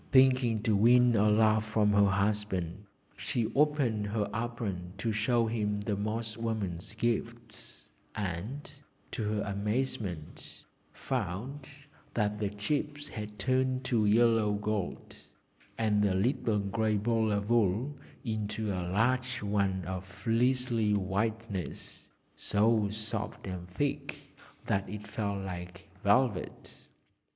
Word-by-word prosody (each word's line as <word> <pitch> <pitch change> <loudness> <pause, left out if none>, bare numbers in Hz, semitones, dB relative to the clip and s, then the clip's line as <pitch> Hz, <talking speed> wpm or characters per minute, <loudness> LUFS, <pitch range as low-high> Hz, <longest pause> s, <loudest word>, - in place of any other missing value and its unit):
Thinking 130 -4 +4
to 110 -2 +3
win 120 +3 +6
a 105 0 +4
laugh 110 0 +4
from 105 -1 +2
her 100 0 +5
husband, 100 -2 -1 0.3
she 115 -2 -2
opened 135 -8 +2
her 105 0 -1
apron 110 -6 -3
to 110 +3 -1
show 115 +2 +2
him 105 -2 -1
the 105 0 -1
Moss 110 +2 -3
woman's 110 -5 -3
gifts, 115 0 -3 0.3
and, 105 - -4 0.4
to - - -4
her 105 -1 0
amazement, 100 - -3 0.3
found 130 +10 -4 0.5
that 105 -1 0
the 105 -2 0
chips 145 +8 -2
had 105 -1 -7
turned 130 +1 +1
to 115 -4 +2
yellow 115 -1 +4
gold, 105 -2 -3 0.6
and 105 -2 +2
the 100 -2 +2
little 115 +1 +1
grey 110 +1 0
ball 110 +1 +1
of 100 +2 -1
wool 120 +5 +2 0.3
into 110 -1 -2
a 90 -2 -2
large 125 +4 +1
one 100 -3 0
of 95 0 -4
fleecy 115 +2 +1
whiteness, 100 0 -3 0.3
so 105 0 +2
soft 105 0 -5
and 90 -2 -5
thick 135 +11 -3 0.3
that 100 -1 0
it 105 +1 -6
felt 100 -3 -3
like 90 +1 -7
velvet! 105 -1 0
105 Hz, 120 wpm, -31 LUFS, 100-115 Hz, 0.6 s, win